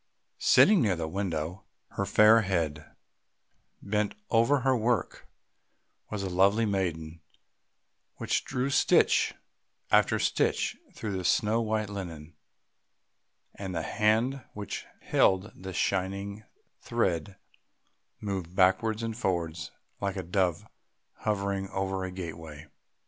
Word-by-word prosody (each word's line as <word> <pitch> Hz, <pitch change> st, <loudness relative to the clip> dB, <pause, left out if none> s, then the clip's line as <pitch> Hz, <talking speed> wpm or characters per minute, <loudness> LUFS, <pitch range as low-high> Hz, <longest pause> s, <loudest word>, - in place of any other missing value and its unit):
Sitting 205 Hz, -5 st, +6 dB
near 100 Hz, -5 st, +2 dB
the 80 Hz, -1 st, -3 dB
window, 90 Hz, -1 st, -3 dB, 0.3 s
her -, -, -3 dB
fair 110 Hz, +2 st, +6 dB
head 80 Hz, -7 st, -2 dB, 0.9 s
bent 105 Hz, 0 st, -1 dB, 0.2 s
over 115 Hz, +5 st, +4 dB
her 130 Hz, +1 st, +3 dB
work, 115 Hz, -4 st, -1 dB, 0.8 s
was 105 Hz, -2 st, -4 dB
a -, -, -2 dB
lovely 100 Hz, +5 st, +3 dB
maiden: 85 Hz, -5 st, -2 dB, 1.1 s
she -, -, +1 dB
drew 130 Hz, +2 st, -2 dB
stitch -, -, +3 dB, 0.6 s
after -, -, +4 dB
stitch -, -, 0 dB, 0.2 s
through 105 Hz, -3 st, -4 dB
the 95 Hz, -, -3 dB
snow 110 Hz, +6 st, +2 dB
white 110 Hz, -1 st, -1 dB
linen, 85 Hz, -6 st, -7 dB, 1.2 s
and 95 Hz, -2 st, -6 dB
the 80 Hz, -, -1 dB
hand 115 Hz, +7 st, +1 dB
which 105 Hz, -2 st, -6 dB
held 95 Hz, +3 st, +2 dB
the 95 Hz, 0 st, -8 dB
shining 100 Hz, +3 st, -2 dB, 0.3 s
thread 90 Hz, +3 st, -1 dB, 0.8 s
moved 95 Hz, -4 st, -4 dB
backwards 105 Hz, +4 st, +2 dB
and 115 Hz, -1 st, -3 dB
forwards 85 Hz, -7 st, -2 dB, 0.3 s
like 100 Hz, -1 st, -2 dB
a 95 Hz, -, -4 dB
dove 90 Hz, -1 st, 0 dB, 0.5 s
hovering 100 Hz, -2 st, -2 dB
over 95 Hz, 0 st, -2 dB
a 95 Hz, -, -3 dB
gateway. 80 Hz, -4 st, -8 dB
95 Hz, 115 wpm, -28 LUFS, 90-110 Hz, 1.2 s, Sitting